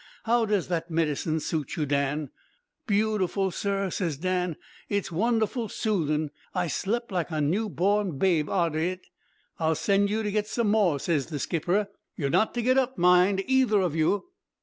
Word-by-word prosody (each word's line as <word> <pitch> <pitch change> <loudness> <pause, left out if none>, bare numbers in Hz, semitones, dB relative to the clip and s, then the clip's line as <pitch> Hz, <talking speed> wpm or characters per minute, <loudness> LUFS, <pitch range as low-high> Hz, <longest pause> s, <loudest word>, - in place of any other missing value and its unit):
How 235 0 +2
does 205 -4 0
that 170 -1 -2
medicine 160 -1 0
suit 150 -3 -3
you, 155 - -1
Dan?' 140 0 -1 0.6
"'Beautiful, 200 -3 +1
sir,' 195 +1 -1
says 165 -7 -2
Dan. 180 0 -1 0.3
'It's 200 -3 -1
wonderful 225 +4 0
soothing. 155 -10 -1 0.2
I 180 -1 +1
slep' 235 - -2
like 180 -3 -1
a 155 -2 -2
new 190 +10 0
born 195 -3 0
babe 165 -3 +2
arter 170 -4 +1
it.' 185 +3 -2 0.5
"'I'll 160 -1 +2
send 200 +4 +2
you 220 +2 -1
to 210 - -1
get 210 0 0
some 225 -2 0
more,' 190 -9 +3
ses 150 -3 0
the 155 - -4
skipper. 175 +8 0 0.3
'You're 140 -3 -1
not 220 - +2
to 240 - -1
get 255 +2 +4
up, 260 0 -1
mind, 180 +2 +4
either 260 -5 +3
of 180 -5 0
you.' 165 - +1
185 Hz, 170 wpm, -27 LUFS, 160-210 Hz, 0.6 s, get